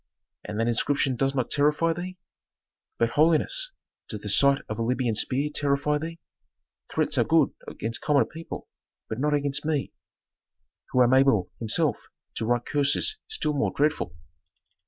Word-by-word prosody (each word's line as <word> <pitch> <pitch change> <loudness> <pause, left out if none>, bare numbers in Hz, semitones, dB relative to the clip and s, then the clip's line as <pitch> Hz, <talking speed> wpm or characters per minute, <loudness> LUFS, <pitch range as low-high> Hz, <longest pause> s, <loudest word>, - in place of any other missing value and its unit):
'" - - -63
"And 105 +1 -5
that 115 - +1
inscription 130 +3 +1
does 135 +2 0
not 125 -3 -1
terrify 150 +3 +3
thee?" 180 +2 -6 0.8
"But, 115 0 +1
holiness, 165 - +2 0.4
does - - -5
the - - -5
sight 140 0 +4
of 110 - -5
a - - 0
Libyan 120 0 0
spear 135 +7 0
terrify 145 +1 +1
thee? 165 +2 -6 0.7
Threats - - 0
are - - +5
good - - +3
against 115 +1 -3
common 145 -2 +3
people, 165 +1 -8 0.4
but 110 - -4
not 150 +2 +2
against 145 0 +1
me, 150 -3 -1 1.0
who 125 - +4
am 120 +1 +3
able 130 -8 +3
myself 110 - +1 0.4
to 110 - -2
write 120 0 +1
curses 145 - +2
still 435 - -1
more 145 -1 0
dreadful." 150 - 0
140 Hz, 155 wpm, -26 LUFS, 120-150 Hz, 1.0 s, are